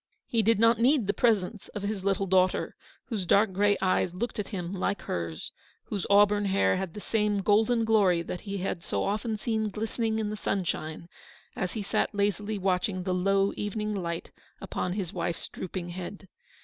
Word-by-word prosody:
He 230 - +1
did 225 +1 +3
not 230 +1 +4
need 255 0 +4
the 200 - +1
presence 215 -2 +1
of 205 - -4
his 200 -2 -2
little 195 0 +1
daughter, 185 0 +2 0.3
whose 205 -7 -2
dark 200 +1 +4
grey 205 +1 +3
eyes 185 -1 +1
looked 225 +3 -3
at 210 - -2
him 180 -3 -4
like 200 +1 -1
hers, 85 -2 -4 0.3
whose 200 -4 -4
auburn 205 0 +5
hair 195 -1 +3
had 185 -2 -4
the - - -5
same 210 -1 0
golden 225 +3 +3
glory 195 -6 +4
that 175 +1 -5
he 200 -1 -4
had 185 -2 -3
so - - -2
often 215 +2 -1
seen 220 0 -1
glistening 220 +2 -2
in 215 -1 -1
the - - -3
sunshine 170 -5 -2 0.5
as 180 - -2
he 215 - -3
sat 200 - 0
lazily 205 +1 0
watching 185 0 0
the 185 0 -1
low 195 +2 +2
evening 210 +1 -2
light 170 -4 -4 0.3
upon 180 - -3
his 190 -2 -3
wife's 170 -1 -2
drooping 180 -1 -5
head. 185 +2 -7
200 Hz, 185 wpm, -28 LUFS, 185-215 Hz, 0.5 s, auburn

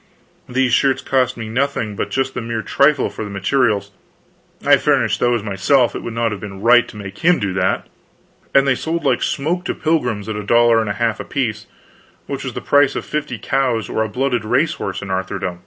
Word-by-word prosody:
These 125 -1 +1
shirts 135 +1 +2
cost 130 -2 +1
me 115 -1 -5
nothing 115 -3 -1
but - - -3
just 135 0 -1
the - - -4
mere 115 -1 -3
trifle 140 -1 +3
for - - -6
the 105 - -6
materials 100 0 0 0.7
I - - +6
furnished - - +1
those 120 -3 +1
myself, 105 +4 +2
it - - -3
would 115 - -6
not 115 -1 0
have 105 - -6
been 95 -2 -8
right 120 +3 +5
to - - -11
make 100 -1 -8
him 175 +1 +4
do 100 -3 -2
that 95 - 0 0.7
and 135 0 +5
they 135 - +4
sold 165 +5 -3
like 130 -4 +1
smoke 170 +6 -1
to - - -2
pilgrims 125 -10 -1
at 110 - -3
a 105 - -3
dollar 115 +1 +4
and 110 - -3
a - - 0
half 115 0 -1
apiece, 115 -6 -3 0.6
which - - -5
was - - -5
the - - -4
price 145 -1 +3
of - - -4
fifty 150 -5 -3
cows 125 -4 -1
or - - -1
a 110 - -4
blooded 125 -3 -1
race 125 +9 +1
horse 100 -11 -5
in 100 - -6
Arthurdom. 95 -1 -3
120 Hz, 215 wpm, -19 LUFS, 105-135 Hz, 0.7 s, I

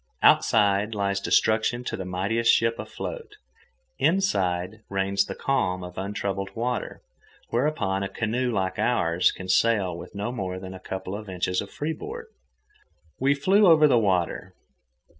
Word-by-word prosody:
Outside 105 0 +4
lies 100 -1 0
destruction 110 +4 +2
to - - -3
the 95 - -5
mightiest 100 +6 +1
ship 115 0 +2
afloat. 460 -4 -7 0.7
Inside 100 - +1
reigns 95 0 +1
the - - -6
calm 95 -10 0
of 90 0 -9
untroubled 100 0 -3
water, 120 +2 -3 0.5
whereon 115 -7 0
a 100 - -2
canoe 120 +3 -1
like 95 -4 -2
ours 85 -7 +2
can 95 - -9
sail 95 -2 +2
with 85 - -10
no 105 +4 -3
more 95 -6 -4
than 95 0 -8
a 95 - -9
couple 95 +1 -5
of 105 -1 -8
inches 90 0 -1
of - - -8
free 155 +2 -3
board. 460 - -7 0.9
We 140 +2 +3
flew 195 +8 +4
over 155 -3 +7
the 125 -4 +4
water. 95 -2 -1
100 Hz, 150 wpm, -25 LUFS, 95-120 Hz, 0.9 s, over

